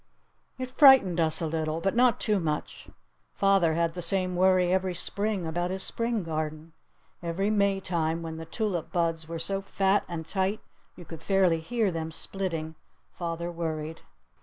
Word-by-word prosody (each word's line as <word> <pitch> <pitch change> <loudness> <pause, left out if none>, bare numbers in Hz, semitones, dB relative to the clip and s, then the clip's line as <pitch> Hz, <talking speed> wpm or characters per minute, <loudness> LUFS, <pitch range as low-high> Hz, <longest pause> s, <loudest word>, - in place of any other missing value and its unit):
It 255 -1 -5
frightened 260 - +6
us 160 0 +2
a - - 0
little. 160 0 -2
But 195 +4 -1
not 245 -2 +4
too 210 -2 +1
much. 155 -3 -4 0.5
Father 195 -5 +3
had 165 0 0
the 175 - -5
same 185 +1 +1
worry 185 0 +3
every 185 -1 0
Spring 200 +1 -1
about 175 +2 -2
his 190 +1 -2
Spring 230 -3 -1
garden. 155 0 -4 0.5
Every 180 +5 -1
Maytime 185 -5 0
when 160 -1 -6
the 160 - -7
tulip 185 -2 -3
buds 165 -2 -1
were 165 - -4
so 195 +4 -2
fat 195 0 +1
and 165 -2 -5
tight 195 +4 -1 0.4
you 175 - -12
could 160 0 -9
fairly 185 -3 +2
hear 220 +3 0
them 160 -1 -4
splitting, 165 -2 -4 0.4
father 170 0 -4
worried. 160 -2 -4
175 Hz, 160 wpm, -27 LUFS, 165-195 Hz, 0.5 s, frightened